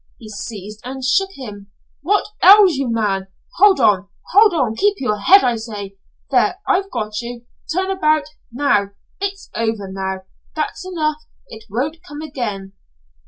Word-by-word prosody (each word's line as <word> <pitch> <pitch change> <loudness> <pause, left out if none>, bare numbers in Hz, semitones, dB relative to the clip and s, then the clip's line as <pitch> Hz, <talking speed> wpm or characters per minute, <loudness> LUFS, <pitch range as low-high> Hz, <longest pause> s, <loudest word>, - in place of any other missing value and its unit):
He 220 - -12
seized 215 0 -8
and 265 +1 -6
shook 385 +9 +2
him. 205 - -9 0.3
"What 400 +8 +1 0.2
ails 390 -1 +8
you, 270 -4 -1
man? 200 -4 0 0.3
Hold 395 0 +6
on. 200 -1 +3 0.2
Hold 420 +2 +6
on. 260 -10 0
Keep 410 - +2
your 210 - -1
head, 390 - +6
I 240 -2 +1
say. 205 -3 -7 0.4
There! 370 -3 +3
I've 390 0 +1
got 215 - -3
you. 240 0 -8 0.3
Turn 375 +3 0
about. 310 -5 +2 0.3
Now! 230 -6 +1 0.3
It's 395 0 -5
over 220 -3 -2
now. 190 0 -4 0.3
That's 310 +4 -3
enough. 310 -4 -1 0.3
It 220 0 -11
won't 270 +10 -2
come 295 +1 -9
again." 215 -10 -5
255 Hz, 155 wpm, -19 LUFS, -, 0.4 s, ails